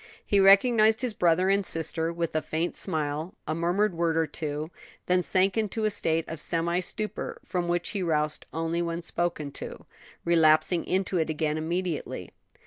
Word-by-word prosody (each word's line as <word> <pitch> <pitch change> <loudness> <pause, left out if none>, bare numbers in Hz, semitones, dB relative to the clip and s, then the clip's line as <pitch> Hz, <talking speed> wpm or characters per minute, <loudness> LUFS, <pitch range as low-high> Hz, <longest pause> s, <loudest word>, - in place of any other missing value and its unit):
He 200 - +2
recognized 215 +3 +5
his 245 -3 -1
brother 175 -1 +2
and 200 0 +2
sister 165 -1 -1
with 170 -1 -3
a 155 - +2
faint 165 +3 -2
smile, 155 +1 -2
a 155 - 0
murmured 175 +5 +1
word 165 -1 0
or 165 - +3
two, 155 0 -4 0.3
then 180 0 +2
sank 190 +2 +1
into 220 0 -1
a 215 - +2
state 165 -4 0
of 160 - -6
semi 170 +1 +1
stupor, 210 +3 -4
from 180 -2 -2
which 175 0 0
he 205 -2 -3
roused 150 -3 -1
only 165 +1 -1
when 170 0 -3
spoken 165 -4 -2
to, - - -8 0.4
relapsing 165 +1 +3
into 185 -1 0
it 160 - 0
again 155 -1 -1
immediately. 170 +1 -3
170 Hz, 170 wpm, -27 LUFS, 160-185 Hz, 0.4 s, recognized